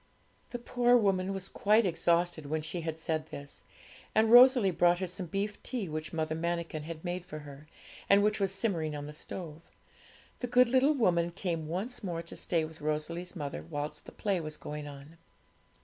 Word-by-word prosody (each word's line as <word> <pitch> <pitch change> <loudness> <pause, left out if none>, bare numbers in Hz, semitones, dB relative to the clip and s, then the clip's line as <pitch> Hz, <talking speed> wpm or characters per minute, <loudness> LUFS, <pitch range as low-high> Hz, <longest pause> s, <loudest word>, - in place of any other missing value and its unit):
The 245 - -4
poor 245 0 +3
woman 195 -3 +1
was 195 -1 -4
quite 215 +3 +3
exhausted 170 -2 +1
when 155 +1 -2
she 170 +2 -4
had 160 -1 -4
said 160 -1 -2
this; 140 -1 -9 0.5
and 220 0 +4
Rosalie 245 -4 +8
brought 175 0 +4
her 185 - -2
some 180 0 -4
beef 200 +4 -3
tea 240 -7 -3
which 155 0 -5
Mother 160 -1 -1
Manikin 170 -1 -2
had 160 +2 -8
made 175 0 -2
for 155 - -8
her, 145 0 -11 0.4
and 200 0 +6
which 210 +1 +2
was 195 -2 +1
simmering 170 -7 -1
on 145 0 -5
the 150 - -8
stove. 160 0 -8 0.8
The 250 - -2
good 245 0 +5
little 265 +4 +4
woman 170 -9 +2
came 170 -3 -3
once 210 +10 -4
more 170 -3 -3
to 170 - -9
stay 165 -3 0
with 155 0 -12
Rosalie's 155 +5 -3
mother 145 - -4
whilst 150 +1 -4
the - - -10
play 195 -4 -1
was 155 -1 -6
going 150 0 -6
on. 145 +3 -11
170 Hz, 190 wpm, -31 LUFS, 155-200 Hz, 0.8 s, Rosalie